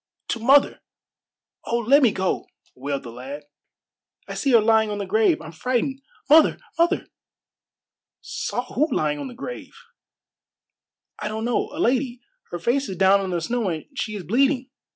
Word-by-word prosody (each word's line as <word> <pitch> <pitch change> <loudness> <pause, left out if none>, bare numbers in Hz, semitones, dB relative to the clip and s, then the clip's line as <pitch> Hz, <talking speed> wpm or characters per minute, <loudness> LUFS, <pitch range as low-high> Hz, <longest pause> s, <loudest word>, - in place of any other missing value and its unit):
"To 235 - -1
mother. 275 +5 +4 0.8
Oh, 235 - 0
let 255 +5 +4
me 245 -5 +5
go!" 190 -1 -2 0.3
wailed 140 +1 -4
the 120 - -8
lad. 135 +5 -8 0.8
"I - - -6
see 280 - -1
her 235 -3 +7
lying 220 0 +3
on 205 - -3
the 200 - -3
grave. 215 +3 +2
I'm 155 - -9
frightened. 255 - -2 0.3
Mother! 310 +1 +6 0.2
mother!" 345 +3 +2 1.1
"Saw 245 - -4
who 300 +3 +1
lying 150 -8 0
on - - -5
the 250 - -10
grave?" 485 - -8 1.4
"I 210 - -3
don't 220 +1 -3
know. 240 - 0
A 295 - -9
lady. 255 -4 0 0.3
Her - - -4
face 250 +10 0
is 190 - -5
down 195 +1 +4
in 190 - -3
the 175 -2 -1
snow, 235 +3 -1
and 160 -3 -4
she 215 -5 -3
is 200 - -6
bleeding. 260 - +1
225 Hz, 170 wpm, -23 LUFS, 185-265 Hz, 1.4 s, her